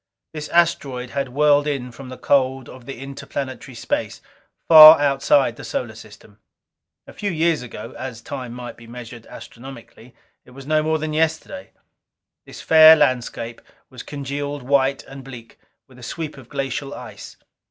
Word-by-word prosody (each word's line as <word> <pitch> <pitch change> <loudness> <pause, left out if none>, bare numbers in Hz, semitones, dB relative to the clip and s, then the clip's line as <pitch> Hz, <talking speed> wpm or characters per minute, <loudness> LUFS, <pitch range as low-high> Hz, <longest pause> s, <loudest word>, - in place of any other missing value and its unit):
This 150 -1 -6
asteroid 140 -7 0
had 140 -2 -3
whirled 145 +2 +2
in 135 -4 -3
from 130 +2 -11
the 130 - -9
cold 130 -2 0
of 125 -2 -13
the 135 - -7
interplanetary 135 -1 -7
space, - - -3 0.5
far 155 -1 +10
outside 145 - +2
our - - -9
solar - - -4
system. - - -16 0.7
A - - -14
few 205 - -4
years 165 -3 0
ago 125 - -9
as 130 -3 -7
time 125 -1 -7
might 120 0 -9
be 115 - -15
measured 120 -1 -11
astronomically, 125 -1 -13 0.3
it - - -19
was 135 - -10
no 155 +1 +1
more 160 +1 0
than 155 0 -4
yesterday 160 - -2 0.8
this - - -11
fair 160 0 +8
landscape 120 -5 -1 0.3
was 125 -2 -9
congealed 145 0 -6
white 135 +1 +1
and 135 0 -12
bleak 120 -3 -12 0.3
with 130 -1 -18
a - - -14
sweep 155 +5 -6
of 130 -4 -15
glacial 135 +1 -4
ice. - - -11
135 Hz, 160 wpm, -21 LUFS, 125-150 Hz, 0.8 s, far